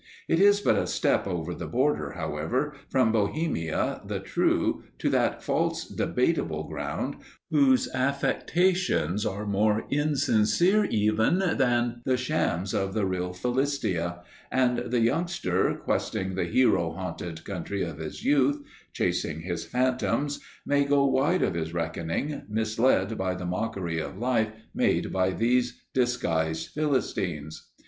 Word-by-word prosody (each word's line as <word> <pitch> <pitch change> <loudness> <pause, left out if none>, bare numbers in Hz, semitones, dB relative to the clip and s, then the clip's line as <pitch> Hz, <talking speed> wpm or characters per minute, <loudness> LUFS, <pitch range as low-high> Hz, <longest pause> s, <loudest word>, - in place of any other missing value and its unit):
It 165 - +2
is 205 +1 +5
but - - +3
a - - 0
step - - +1
over 90 -2 -3
the - - -6
border, 135 +5 0
however, 125 - -2 0.2
from 130 -4 +3
Bohemia 105 - -1
the - - -3
true - - 0
to - - 0
that - - +1
false - - 0
Debatable - - 0
Ground - - -4 0.3
whose 140 -4 +4
affectations 140 - +1
are 100 +2 -4
more 105 +2 +1
insincere 145 - +3
even 110 - +2
than 120 -9 +1
the 130 0 +1
shams 120 - -1
of 95 0 -1
the 105 -3 +1
real 90 -1 -2
Philistia, 90 - -1 0.3
and 125 -1 +2
the 120 -1 +1
youngster, 120 - +1
questing 95 0 -2
the 90 -1 -1
hero 85 -5 +2
haunted 90 -2 -6
country 100 +1 -3
of 80 -3 -5
his 80 -1 -7
youth, 140 0 +3 0.4
chasing 80 -1 -1
his 85 -1 -4
phantoms, 130 +3 0 0.3
may 145 0 +3
go 140 0 +3
wide 140 +7 +2
of - - +1
his 80 0 -3
reckoning, 85 - -2
misled 110 -1 +1
by 95 -1 0
the 90 0 -5
mockery 90 -3 -2
of 85 - -5
life 115 -1 +1 0.2
made - - +1
by 95 0 +2
these 120 +4 +1
disguised 80 -11 0
Philistines. 95 - -2
110 Hz, 135 wpm, -27 LUFS, 90-140 Hz, 0.4 s, is